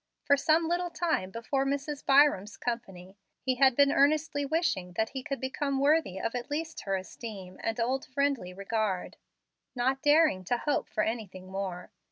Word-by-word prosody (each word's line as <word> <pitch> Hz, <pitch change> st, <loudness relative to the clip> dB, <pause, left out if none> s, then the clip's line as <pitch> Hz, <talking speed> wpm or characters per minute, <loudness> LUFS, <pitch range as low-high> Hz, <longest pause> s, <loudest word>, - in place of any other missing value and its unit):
For 285 Hz, -, +5 dB
some 315 Hz, +3 st, +2 dB
little 350 Hz, +1 st, 0 dB
time 325 Hz, -, -1 dB
before 235 Hz, +6 st, -1 dB
Mrs. 280 Hz, +1 st, -3 dB
Byram's 275 Hz, -8 st, +4 dB
company, 195 Hz, -6 st, -5 dB, 0.2 s
he 255 Hz, -1 st, -1 dB
had 265 Hz, -1 st, +5 dB
been 280 Hz, +1 st, +5 dB
earnestly 290 Hz, +1 st, +2 dB
wishing 270 Hz, -, 0 dB
that 220 Hz, +5 st, 0 dB
he 265 Hz, -, -5 dB
could 275 Hz, +1 st, -4 dB
become 275 Hz, +1 st, -2 dB
worthy 285 Hz, -, +2 dB
of 230 Hz, -, -2 dB
at 245 Hz, -1 st, -4 dB
least 315 Hz, +2 st, -4 dB
her 195 Hz, -1 st, 0 dB
esteem 190 Hz, -1 st, -8 dB
and 225 Hz, +1 st, -2 dB
old 255 Hz, +3 st, 0 dB
friendly 275 Hz, -8 st, -1 dB
regard, 200 Hz, 0 st, -2 dB, 0.6 s
not 260 Hz, +2 st, 0 dB
daring 295 Hz, -, +4 dB
to 245 Hz, +7 st, +1 dB
hope 290 Hz, +4 st, -1 dB
for 215 Hz, -, 0 dB
anything 195 Hz, -5 st, -5 dB
more. 190 Hz, -2 st, -5 dB
255 Hz, 170 wpm, -29 LUFS, 195-285 Hz, 0.6 s, For